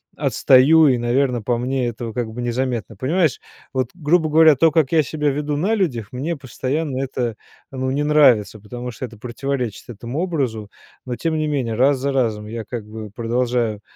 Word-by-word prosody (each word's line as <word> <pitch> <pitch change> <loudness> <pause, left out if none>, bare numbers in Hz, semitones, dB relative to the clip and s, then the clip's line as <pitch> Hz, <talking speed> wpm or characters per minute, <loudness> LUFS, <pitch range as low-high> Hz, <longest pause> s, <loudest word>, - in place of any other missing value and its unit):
отстаю 150 +5 +5
и, 130 -3 +3
наверно, 120 +1 +1
по 120 +3 0
мне 125 +1 -1
этого 115 -1 -5
как 120 -1 -2
бы 120 +2 -6
незаметно. 120 -2 -2
Понимаешь, 155 - +1 0.3
вот, 130 -3 -1
грубо 160 -1 +1
говоря, 160 0 +6
то, 160 +4 +4
как 155 -3 +2
я 160 -2 +5
себя 150 +2 -1
веду 145 +1 -2
на 195 +9 +1
людях, 125 - -1
мне 145 +7 -3
постоянно 135 +1 -3
это, 125 -4 -2 0.4
ну, 130 -1 -2
не 145 +2 0
нравится, 135 -8 +4
потому 120 +4 -7
что 120 - -6
это 115 -2 -12
противоречит 125 0 -4
этому 120 +5 -5
образу, 135 - -2 0.4
но, 125 -1 -3
тем 165 -1 -1
не 155 0 0
менее, 130 -7 -1
раз 135 +4 +3
за 140 +2 -1
разом 110 -5 0
я 115 +1 -5
как 120 -4 -6
бы 110 0 -8
продолжаю 120 -1 -1
130 Hz, 185 wpm, -21 LUFS, 120-150 Hz, 0.4 s, говоря